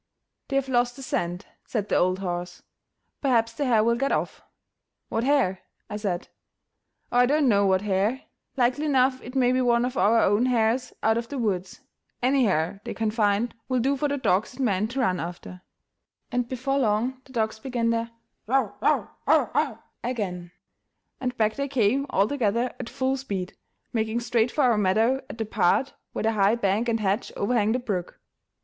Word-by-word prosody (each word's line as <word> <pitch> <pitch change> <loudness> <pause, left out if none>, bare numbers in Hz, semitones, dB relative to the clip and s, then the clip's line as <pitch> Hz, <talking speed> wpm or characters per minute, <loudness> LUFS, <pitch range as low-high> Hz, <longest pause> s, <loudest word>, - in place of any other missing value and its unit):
"They 275 - -3
have 275 -1 +1
lost 245 -1 +1
the 270 - -9
scent," 175 -6 -2 0.2
said 210 -4 -3
the - - 0
old 185 +1 +2
horse; 175 -2 -5 0.6
"perhaps 230 -4 +2
the 285 +5 -2
hare 230 -4 +4
will 235 +1 +3
get 275 +4 0
off." - - -2 0.7
"What 225 - -1
hare?" 255 -9 +2 0.3
I 210 - -3
said. 195 -5 -3 0.8
"Oh, 245 - +3
I 245 - +5
don't 295 +1 +3
know 200 -4 +4
what 190 0 +2
hare; 210 +5 0 0.4
likely 255 +5 +1
enough 260 -2 +2
it 250 +2 -10
may 250 -2 +3
be 255 0 +2
one 240 -1 +3
of 255 +1 -4
our 225 +3 +4
own 205 +6 +3
hares 245 +1 +1
out 220 +1 +3
of 235 - -6
the 285 - -5
woods; 190 -6 -2 0.4
any 260 +1 +3
hare 185 +1 0
they - - -5
can 220 -1 0
find 215 +1 +1 0.2
will 255 - +1
do 270 +4 +2
for 295 +2 0
the 285 0 -1
dogs 220 -2 +1
and 265 0 -1
men 205 -1 +1
to 255 +4 -2
run 185 -7 +1
after"; 180 +1 -7 0.7
and 245 -1 -1
before 270 +2 -1
long 245 +2 0
the 260 - -16
dogs 220 -2 -1
began 235 -1 -1
their 230 0 -1 0.4
"yo; 255 -6 +2
yo, - - +2 0.2
o, - - +4
o!" - - 0 0.3
again, 190 -8 -3 0.7
and 250 -1 -3
back 215 -1 +2
they 280 +3 -2
came 265 +1 +1
all 195 +2 +2
together 240 -2 0
at 230 - -5
full 265 +1 -1
speed, 200 -9 -4 0.4
making 220 0 0
straight 235 0 +1
for 295 - 0
our 235 -4 +4
meadow 220 +6 +3
at - - -8
the 225 - -2
part 215 +6 +1 0.2
where - - -4
the 225 - +2
high 205 0 +3
bank 220 +1 0
and 225 -1 0
hedge 200 +3 0
overhang 215 0 +1
the 245 - +2
brook. 200 -8 -4
230 Hz, 195 wpm, -25 LUFS, 205-255 Hz, 0.8 s, I